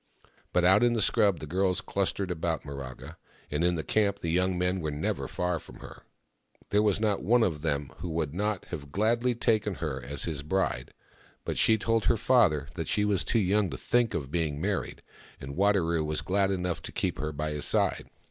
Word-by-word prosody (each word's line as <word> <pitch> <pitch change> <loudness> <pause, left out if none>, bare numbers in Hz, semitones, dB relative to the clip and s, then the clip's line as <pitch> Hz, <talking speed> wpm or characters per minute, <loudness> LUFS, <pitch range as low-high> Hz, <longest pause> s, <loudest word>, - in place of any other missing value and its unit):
But 90 0 +2
out 95 +3 +6
in 120 -1 +4
the 115 - 0
scrub 105 -3 +3
the 75 - -7
girls 90 +4 +1
clustered 100 -1 -2
about 80 -1 -2
Miraga, 70 -3 -8 0.3
and 75 +3 0
in 90 0 +3
the 80 - -3
camp 100 +1 +1
the 85 -4 -3
young 90 +1 +1
men 90 +1 0
were 80 - -2
never 75 +1 -2
far 90 -2 -1
from - - -13
her. - - -12 0.7
There 105 - +4
was 105 -2 +2
not 105 -2 +1
one 120 +3 +3
of 80 -8 -1
them 70 -3 -1
who 85 +2 -5
would 80 -3 -2
not 105 +1 -2
have 70 -5 -7
gladly 115 +5 +1
taken 110 -4 +1
her 75 -6 -4
as 70 +2 -3
his 80 -5 -2
bride, 95 +6 -2 0.5
but - - -2
she 110 - +5
told 115 0 0
her 115 - +3
father 105 - +3
that 80 -3 -4
she 105 -1 +1
was 100 -2 +1
too 115 - +1
young 100 -1 +2
to - - -6
think 120 -3 +1
of 70 -5 -4
being 80 -4 -1
married, - - -2 0.4
and 70 +1 -7
Wadaro 90 -5 +2
was 75 0 -2
glad 95 +1 +1
enough 90 -2 -2
to - - -7
keep - - -2
her 75 0 -2
by 75 +1 -3
his 75 -1 -1
side. - - +1
90 Hz, 210 wpm, -28 LUFS, 75-105 Hz, 0.7 s, out